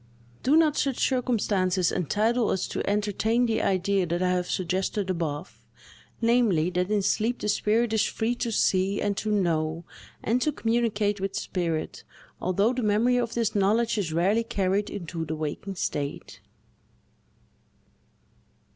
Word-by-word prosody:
Do 275 +4 +3
not 310 -2 +3
such 275 -3 0
circumstances 200 -8 +1
entitle 215 - +1
us 190 - -1
to - - -3
entertain 210 +3 +1
the 225 -1 0
idea 190 0 +1
that 175 +2 -1
I 180 - +2
have 180 -1 -1
suggested 190 +2 -1
above, 165 -1 -4 0.6
namely, 230 -8 +2
that 180 +1 -1
in 210 -2 +1
sleep 225 +5 +1
the - - -4
spirit 220 +2 +1
is 220 - +3
free 225 +2 -1
to 240 -1 -3
see, 195 -1 +1
and 205 -1 0
to 215 - -2
know, 165 -5 0 0.4
and 240 +4 +1
to 305 - +2
communicate 225 -5 0
with 195 0 -3
spirit, 170 -6 -3 0.4
although 200 +6 +2
the 255 - -2
memory 225 +3 +2
of 235 -2 -1
this 230 -3 0
knowledge 215 +3 +2
is 175 -6 -2
rarely 190 +8 +2
carried 200 -2 0
into 170 -3 -5
the 160 0 -4
waking 155 +6 -4
state? 145 -5 -4
205 Hz, 145 wpm, -26 LUFS, 180-230 Hz, 0.6 s, Do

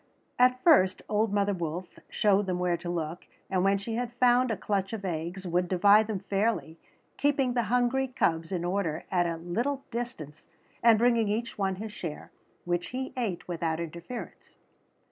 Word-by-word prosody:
At 255 0 +4
first 190 - +5
old 215 0 +1
mother 205 0 +1
wolf 175 0 -5
showed 205 -1 +2
them 180 -1 0
where 180 -1 +1
to 170 +1 -6
look, 170 0 -4 0.2
and 185 -1 +2
when 195 +1 +3
she 200 +3 -5
had 245 -1 -2
found 245 +1 +4
a 225 - -1
clutch 195 +1 -2
of 205 -3 -5
eggs 175 +2 -4
would 180 +1 0
divide 200 +4 +5
them 205 -4 -3
fairly, 195 -5 -1 0.4
keeping 275 -3 +2
the 240 - +2
hungry 250 +2 +2
cubs 165 -9 0
in 175 -2 -2
order 175 -4 -1
at 175 -2 +2
a 165 -1 -2
little 235 +12 -2
distance 160 - -6 0.3
and 230 -2 +6
bringing 235 -1 +3
each 225 +3 -2
one 190 -1 0
his 210 +2 -7
share, 165 -6 -7 0.3
which 175 0 -1
he 260 +1 -5
ate 220 -9 -3
without 165 -2 -2
interference. 170 +8 -8
195 Hz, 175 wpm, -28 LUFS, 175-235 Hz, 0.4 s, and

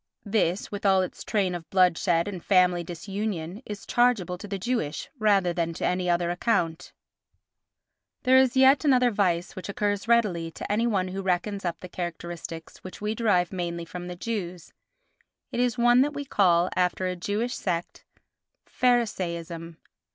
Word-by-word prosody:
This, 200 -3 0
with 205 -1 -5
all 190 -2 +4
its 180 - -7
train 200 -5 0
of 170 -2 -7
bloodshed 180 -1 +3
and 185 -4 -6
family 180 -2 +3
disunion, 190 +1 -4
is 205 -1 -7
chargeable 235 -8 +2
to 205 - -8
the 200 0 -3
Jewish 190 -7 -3
rather 200 -5 +3
than 170 -1 -1
to - - -3
any 180 0 0
other 175 0 +1
account. 175 -3 -1 1.3
There 260 0 +6
is 260 -1 +2
yet 265 +2 +6
another 255 -4 +4
vice 180 -4 0
which 185 - -7
occurs 205 +1 -1
readily 205 -8 +2
to - - -5
any 225 +3 +2
one 190 -5 0
who 195 +1 -4
reckons 195 +2 -1
up 170 -1 -3
the 180 - -7
characteristics 170 -2 -6
which 185 - -10
we 210 +1 -2
derive 205 -6 +1
mainly 170 -2 -3
from 175 +1 -7
the 180 - -6
Jews; 180 -4 -5 0.8
it - - -3
is 245 0 +1
one 240 +1 +5
that 295 +2 0
we 285 0 -4
call, 180 -7 +3
after 180 +1 +1
a 185 0 -1
Jewish 205 +7 -2
sect, 175 -3 -3 0.6
"Pharisaism." 170 -9 -1
185 Hz, 165 wpm, -26 LUFS, 175-215 Hz, 1.3 s, There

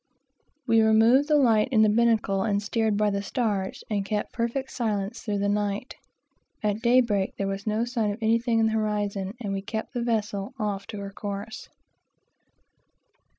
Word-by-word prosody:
We 230 -2 +4
had 220 0 +4
no 230 +5 +6
light 240 -8 +4
in 220 -4 +5
the - - +5
binnacle, 215 -3 +2
but 200 0 0
steered 220 0 0
by 210 0 +2
the 200 0 -1
stars, 205 -4 -2
and 205 -2 -1
kept 210 +1 -3
perfect 235 +3 -2
silence 215 -2 -2
through 210 -3 -2
the 200 0 0
night. 205 +3 -1 0.7
At 210 +1 0
daybreak 235 -5 +2
there 200 - -1
was 195 +1 -4
no 215 +2 +1
sign 235 -3 -1
of 205 - -3
anything 230 +1 +1
in 225 - +3
the 220 - +1
horizon, 210 -2 -2
and 205 -4 -3
we 195 - -2
kept 220 +2 -5
the 245 - -2
vessel 210 -3 -2
off 205 -3 -3
to 210 - -7
her 200 0 -6
course. 205 +5 -6
215 Hz, 175 wpm, -26 LUFS, 200-230 Hz, 0.7 s, no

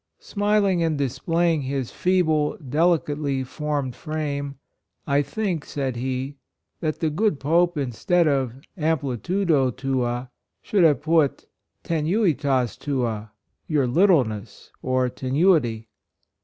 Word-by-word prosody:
Smiling 205 -3 +1
and 160 -2 +1
displaying 160 +4 0
his 135 -2 -3
fee 185 0 +2
ble, 155 -2 +1
delicately 150 -2 0
formed 145 -2 -3
frame, 145 -2 -4 0.3
" - - -52
I 140 0 +2
think," 180 -1 -2
said 135 -3 -3
he, 130 +3 -3 0.4
"that 155 -2 -2
the 160 -2 +1
good 165 -1 +1
Pope, 170 +3 +2
instead 145 +6 +1
of 135 -5 0 0.2
'amplitude* 160 - -1
tuaj 130 -3 0 0.3
should 200 -4 +2
have 150 -4 +4
put 155 -3 +2 0.4
tenuitas 150 - +1
tua" 115 -7 -2 0.2
— - - -50
your 150 -4 +2
littleness 125 - +1
or 130 0 +1
tenuity. 130 - +1
145 Hz, 115 wpm, -24 LUFS, 130-165 Hz, 0.4 s, have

